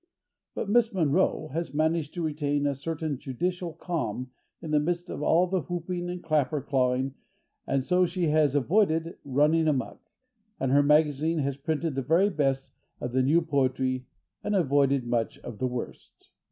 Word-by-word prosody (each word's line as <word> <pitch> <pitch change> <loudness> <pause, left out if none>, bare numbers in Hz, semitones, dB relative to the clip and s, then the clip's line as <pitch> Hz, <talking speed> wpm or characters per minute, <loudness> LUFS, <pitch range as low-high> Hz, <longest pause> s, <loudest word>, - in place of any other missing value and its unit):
But - - -3
Miss 230 +2 +3
Monroe 160 -1 +1
has 160 -1 -4
managed 160 0 0
to 175 - -2
retain 145 -2 -1
a 140 - +1
certain 155 0 -4
judicial 175 +6 -3
calm 155 -8 -3 0.3
in 160 -2 -6
the 150 - +4
midst 175 +3 -2
of - - -5
all 165 +4 +4
the 185 0 -1
whooping 175 +3 -4
and 180 0 -5
clapper 155 -2 +1
clawing, 130 0 0 0.5
and 135 -1 +1
so 180 +4 +3
she 175 -2 -1
has 150 -2 +3
avoided 165 - +2
running 150 +4 +2
amuck, 140 -4 -1 0.6
and 135 -1 0
her 140 +1 +6
magazine 150 +2 +3
has 140 -2 -1
printed 155 +2 -2
the 135 - -1
very 170 +9 +3
best 135 -5 0 0.3
of 120 - -4
the 130 +1 +2
new 155 +6 +3
poetry 130 -3 0 0.4
and 205 - 0
avoided 140 -6 +2
much 120 -1 -1
of 115 -4 -8
the 130 - +1
worst. 125 -1 -8
150 Hz, 165 wpm, -27 LUFS, 135-170 Hz, 0.6 s, her